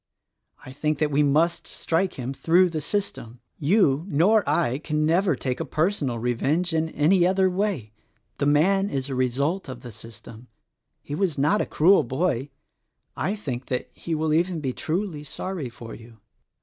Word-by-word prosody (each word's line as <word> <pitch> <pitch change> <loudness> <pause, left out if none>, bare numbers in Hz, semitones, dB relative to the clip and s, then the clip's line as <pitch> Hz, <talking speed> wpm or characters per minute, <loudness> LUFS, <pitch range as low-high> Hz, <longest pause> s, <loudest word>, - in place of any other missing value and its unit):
I 130 - -9
think 150 +2 -1
that 150 0 0
we 145 +1 +3
must 155 +4 +2
strike 175 +3 -1
him 130 +1 -4
through 175 +5 +3
the 155 -2 -3
system. 145 - -3 0.2
You, 155 -3 +3
nor 200 +6 +3
I, 135 -6 +1
can 155 -1 -1
never 175 +1 +2
take 125 0 -3
a - - -1
personal 155 - -1
revenge 140 +9 0
in 160 0 0
any 175 +4 +3
other 190 0 +3
way. 180 - -2 0.5
The 140 - +1
man 195 +7 +3
is 135 -3 -3
the - - -3
result 135 +7 -1
of 125 -2 -8
the 120 - -9
system. 115 +2 -12 0.6
He - - -7
was 165 -1 0
not 150 +10 +2
a - - -2
cruel 185 +6 +4
boy. 135 +1 -1 0.7
I 200 - -1
think 130 - -5
that 125 - -3
he 165 - -4
will 155 0 0
even 170 +1 +1
be 135 -4 -3
truly 165 -1 -3
sorry 155 -1 -5
for 115 -1 -10
you." 115 0 -13
150 Hz, 175 wpm, -24 LUFS, 130-180 Hz, 0.7 s, cruel